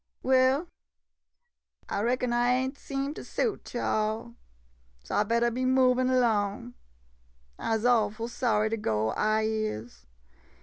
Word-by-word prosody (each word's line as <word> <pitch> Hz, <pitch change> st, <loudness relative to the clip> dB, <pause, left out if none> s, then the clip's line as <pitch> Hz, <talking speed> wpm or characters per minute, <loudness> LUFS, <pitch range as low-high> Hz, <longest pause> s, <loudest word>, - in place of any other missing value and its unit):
Well, 265 Hz, +5 st, +3 dB, 1.2 s
I 200 Hz, -, -2 dB
reckon 245 Hz, +1 st, 0 dB
I 240 Hz, +1 st, +2 dB
ain' 260 Hz, +1 st, 0 dB
seem 275 Hz, 0 st, -4 dB
to -, -, -8 dB
suit 435 Hz, -, -3 dB
yo' 240 Hz, -, -1 dB
all 215 Hz, +1 st, 0 dB
■ 235 Hz, 0 st, -15 dB, 0.3 s
— -, -, -36 dB
so 60 Hz, -, -7 dB
I -, -, +3 dB
bettah 235 Hz, +2 st, +1 dB
be 255 Hz, +3 st, -2 dB
movin' 255 Hz, 0 st, +3 dB
'long. 220 Hz, 0 st, 0 dB, 0.9 s
I 225 Hz, -, 0 dB
'se 220 Hz, -, -5 dB
awful 225 Hz, -2 st, +2 dB
sorry 220 Hz, -3 st, 0 dB
to 225 Hz, -, 0 dB
go, 110 Hz, -, 0 dB
I 215 Hz, -, +1 dB
is. 170 Hz, -, -3 dB
230 Hz, 145 wpm, -28 LUFS, 215-255 Hz, 1.2 s, Well